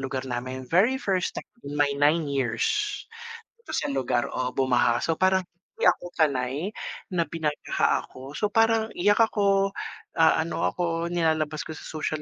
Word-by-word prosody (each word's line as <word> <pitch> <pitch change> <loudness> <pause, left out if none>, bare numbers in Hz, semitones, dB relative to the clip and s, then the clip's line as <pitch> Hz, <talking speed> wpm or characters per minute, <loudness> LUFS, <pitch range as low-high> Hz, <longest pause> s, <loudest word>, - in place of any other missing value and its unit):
lugar 135 0 -3
namin. 130 +1 -4
Very 200 - +3
first 190 -6 -1
time - - -6 0.2
in 145 +1 -6
my 145 -1 +3
9 150 +3 +3
years 140 - 0 0.9
dito 465 - -11
sa - - 0
lugar, 130 -3 0
oo, 125 0 -2
bumaha. 125 -3 +2
So 165 - 0
parang 190 +1 +2 0.4
hindi - - +5
ako - - -1
sanay 135 -5 +1 0.5
na 170 -3 0
binaha 150 -1 0
ako. 135 +3 -11
So 210 - 0
parang 225 0 +3
iyak 205 +4 +3
ako, 200 -3 +3 0.4
ah, 160 -1 +5
ano 170 - -3
ako, 170 -1 -2
nilalabas 160 -3 0
ko 160 - -6
sa - - -10
social 155 0 -3
160 Hz, 160 wpm, -26 LUFS, 135-185 Hz, 0.9 s, hindi